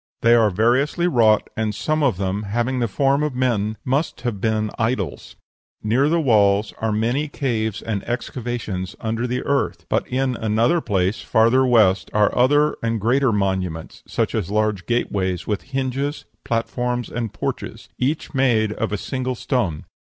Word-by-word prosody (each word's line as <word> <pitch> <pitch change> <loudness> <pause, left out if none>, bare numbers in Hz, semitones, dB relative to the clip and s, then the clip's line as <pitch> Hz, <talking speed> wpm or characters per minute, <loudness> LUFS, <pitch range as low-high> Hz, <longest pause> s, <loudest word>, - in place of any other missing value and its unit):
They 115 0 +6
are 115 -2 +5
variously 125 - +2
wrought, 115 -8 +3
and 110 -2 -1
some 155 +5 -1
of 130 -10 +2
them, 95 +1 -2
having 120 +5 -1
the 120 - +1
form 135 +6 +1
of 150 -4 -1
men, 110 -4 0
must 135 +1 -1
have 115 -6 -3
been 110 -1 0
idols. 110 -4 -2 0.5
Near 125 +7 +2
the 170 +1 +2
walls 105 -6 +3
are 110 0 0
many 120 +8 0
caves 115 -7 -2
and 105 -3 -3
excavations 120 -6 -4
under 115 +2 -2
the 125 +1 -2
earth; 140 0 -1
but - - 0
in 130 0 0
another 115 +10 +2
place, 95 -3 0
farther 120 +4 +3
west, 105 -6 +3
are 105 -1 +3
other 145 +4 +3
and 115 -1 -1
greater 125 +4 +2
monuments, 95 -5 -2
such - - -1
as 105 -6 -2
large 105 -2 0
gate 120 0 0
ways 95 -3 -1
with 105 -2 -2
hinges, 135 +2 -2 0.2
platforms, 120 +1 -2
and 115 -3 -4
porches, - - -5
each 145 +6 -1
made 120 -6 +2
of - - -3
a 105 - -1
single 130 +3 -3
stone. 105 - -1
115 Hz, 165 wpm, -21 LUFS, 105-130 Hz, 0.5 s, They